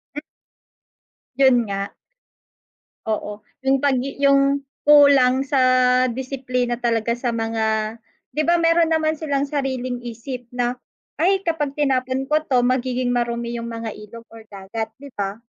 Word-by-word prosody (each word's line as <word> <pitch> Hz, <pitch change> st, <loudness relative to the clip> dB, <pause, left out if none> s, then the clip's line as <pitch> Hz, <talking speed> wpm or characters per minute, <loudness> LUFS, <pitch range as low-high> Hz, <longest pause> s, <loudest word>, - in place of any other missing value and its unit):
M 295 Hz, -, -4 dB, 1.1 s
Yun 260 Hz, -4 st, +4 dB
nga. 200 Hz, 0 st, -4 dB, 1.1 s
Oo, 210 Hz, -1 st, -4 dB, 0.2 s
yung 270 Hz, 0 st, +2 dB
pag 280 Hz, -2 st, +3 dB
i 275 Hz, +1 st, -6 dB
yung 275 Hz, 0 st, +3 dB, 0.2 s
kulang 275 Hz, -3 st, +6 dB
sa 270 Hz, -1 st, +1 dB, 0.5 s
disiplina 250 Hz, -1 st, -3 dB
talaga 235 Hz, -1 st, 0 dB
sa 240 Hz, 0 st, -2 dB
mga 220 Hz, -1 st, -1 dB, 0.4 s
di 305 Hz, -, 0 dB
ba 345 Hz, -, +4 dB
meron 330 Hz, 0 st, +3 dB
naman 315 Hz, -1 st, +1 dB
silang 285 Hz, -3 st, -1 dB
sariling 260 Hz, -3 st, -3 dB
isip 240 Hz, +1 st, -7 dB
na, 245 Hz, 0 st, 0 dB, 0.5 s
ay 385 Hz, +2 st, +2 dB
kapag 295 Hz, -4 st, -1 dB
tinapon 265 Hz, -2 st, 0 dB
ko 305 Hz, +1 st, +3 dB
'to 260 Hz, -6 st, +1 dB
magiging 255 Hz, 0 st, 0 dB
marumi 235 Hz, 0 st, -2 dB
yung 230 Hz, -, -6 dB
mga 230 Hz, -1 st, -5 dB
ilog 230 Hz, +2 st, -12 dB
or 225 Hz, -, -11 dB
dagat, 205 Hz, +3 st, -5 dB
di 280 Hz, +1 st, -11 dB
ba? 200 Hz, +1 st, -3 dB
255 Hz, 140 wpm, -21 LUFS, 230-275 Hz, 1.1 s, kulang